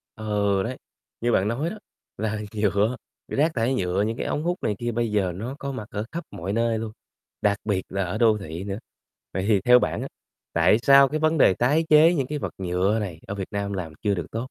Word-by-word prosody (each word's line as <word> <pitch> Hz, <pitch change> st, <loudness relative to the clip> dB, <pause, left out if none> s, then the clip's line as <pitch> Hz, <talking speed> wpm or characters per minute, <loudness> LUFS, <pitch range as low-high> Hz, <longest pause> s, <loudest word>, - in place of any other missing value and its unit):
Ừ, 100 Hz, -2 st, 0 dB
đấy, 125 Hz, +2 st, -4 dB, 0.4 s
như 120 Hz, 0 st, +1 dB
bạn 95 Hz, -1 st, +2 dB
nói 130 Hz, +9 st, -1 dB
đó, 215 Hz, -, -7 dB, 0.4 s
là 110 Hz, 0 st, -2 dB
nhựa, 105 Hz, +3 st, +1 dB, 0.3 s
rác 155 Hz, +4 st, +1 dB
thải 120 Hz, +3 st, +1 dB
nhựa, 90 Hz, -2 st, 0 dB
những 110 Hz, +2 st, -1 dB
cái -, -, -3 dB
ống 150 Hz, -, -1 dB
hút 175 Hz, +2 st, 0 dB
này 105 Hz, -, 0 dB
kia 120 Hz, 0 st, -2 dB
bây 115 Hz, -1 st, -1 dB
giờ 100 Hz, -4 st, +1 dB
nó 120 Hz, +8 st, -5 dB
có 140 Hz, 0 st, -4 dB
mặt 110 Hz, -5 st, -6 dB
ở 105 Hz, +1 st, -3 dB
khắp 170 Hz, +1 st, -4 dB
mọi 95 Hz, +4 st, -4 dB
nơi 115 Hz, 0 st, +1 dB
luôn, 110 Hz, -1 st, -4 dB, 0.5 s
đặc 100 Hz, -1 st, +2 dB
biệt 100 Hz, -3 st, 0 dB
là 95 Hz, 0 st, -1 dB
ở 90 Hz, +4 st, -3 dB
đô 110 Hz, -2 st, +4 dB
thị 85 Hz, -2 st, -6 dB
nữa. 100 Hz, 0 st, -4 dB, 0.6 s
Vậy 95 Hz, -, -1 dB
thì 100 Hz, -3 st, +4 dB
theo 125 Hz, +4 st, +6 dB
bạn -, -, -1 dB
á, -, -, -4 dB, 0.4 s
tại 85 Hz, +6 st, +4 dB
sao 140 Hz, +2 st, +6 dB
cái 155 Hz, +3 st, -2 dB
vấn 155 Hz, 0 st, +2 dB
đề 95 Hz, -, +6 dB
tái 145 Hz, -, +2 dB
chế 155 Hz, +3 st, +7 dB
những 140 Hz, -6 st, 0 dB
cái 150 Hz, +2 st, -3 dB
vật -, -, -4 dB
nhựa 95 Hz, +3 st, +1 dB
này 90 Hz, -6 st, -5 dB
ở 100 Hz, -, -4 dB
Việt 95 Hz, -2 st, -5 dB
Nam 100 Hz, 0 st, -3 dB
làm 90 Hz, -5 st, -4 dB
chưa 105 Hz, -2 st, +2 dB
được 85 Hz, -5 st, -4 dB
tốt? -, -, -7 dB
110 Hz, 240 wpm, -25 LUFS, 100-125 Hz, 0.6 s, chế